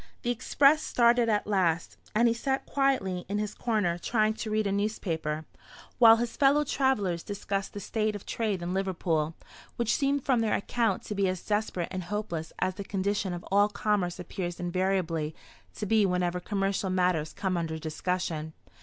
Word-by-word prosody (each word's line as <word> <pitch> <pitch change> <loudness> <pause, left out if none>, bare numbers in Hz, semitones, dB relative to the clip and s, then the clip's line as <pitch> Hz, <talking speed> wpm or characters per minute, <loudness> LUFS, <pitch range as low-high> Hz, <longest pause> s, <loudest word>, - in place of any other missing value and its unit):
The 240 - +1
express 280 +5 +4
started 235 -1 +3
at 210 -1 +1
last, 180 -5 +1 0.2
and 235 +2 +5
he 230 - +3
sat 265 +3 -1
quietly 255 -11 0
in 205 - -1
his 210 0 -2
corner 205 -8 0
trying 215 +3 +1
to 220 0 -5
read 215 0 +1
a 200 - 0
newspaper; 165 -7 -2 0.5
while 225 -2 +9
his 235 0 -2
fellow 285 +2 +4
travellers 235 - +1
discussed 200 0 -3
the 205 - -5
state 215 +1 -1
of 205 - -8
trade 210 -6 -2
in 175 +1 -2
Liverpool, 170 -5 -1 0.4
which 235 -2 +1
seemed 280 -1 0
from 255 -4 +3
their 225 -2 +1
account 225 -1 0
to - - -5
be 200 -1 +1
as 185 -1 -3
desperate 205 -5 -1
and 185 -2 -4
hopeless 175 -5 -4
as 185 - 0
the 200 - -6
condition 200 0 -1
of 175 0 -6
all 205 +1 +5
commerce 200 -4 0
appears 175 0 -5
invariably 175 -3 -1 0.4
to 210 - -4
be 215 +1 +3
whenever 180 -1 0
commercial 195 0 -1
matters 180 -4 +1
come 190 -2 -2
under 165 -2 -2
discussion. 160 0 -3
200 Hz, 175 wpm, -28 LUFS, 180-220 Hz, 0.5 s, while